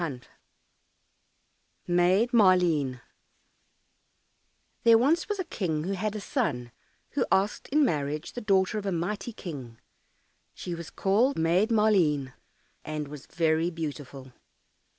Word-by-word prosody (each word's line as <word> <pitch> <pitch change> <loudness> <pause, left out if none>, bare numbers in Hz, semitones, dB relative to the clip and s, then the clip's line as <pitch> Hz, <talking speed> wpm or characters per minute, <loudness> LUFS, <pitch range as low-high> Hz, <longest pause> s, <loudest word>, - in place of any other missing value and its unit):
198 135 -7 -6 1.6
Maid 185 +7 +3
Maleen 175 - +3 1.8
There 230 -1 +7
was 300 +9 +2
once 415 - -1
a 375 - -2
King 160 - -3
who 185 - -3
had 205 +2 -2
a - - -3
son 125 -10 -2 0.4
who - - 0
asked 195 +2 +1
in 295 +1 +3
marriage 150 - -2
the 245 - -5
daughter 195 0 +2
of 200 - -6
a - - 0
mighty 190 +7 -3
King; 135 - -8 0.8
she 175 - -6
was 170 -1 -7
called 225 +8 +1
Maid 170 +7 +2
Maleen, 180 - +2 0.5
and 150 -2 -5
was 145 -2 -10
very 165 0 +1
beautiful. 145 -5 -7
175 Hz, 125 wpm, -27 LUFS, 150-210 Hz, 1.8 s, There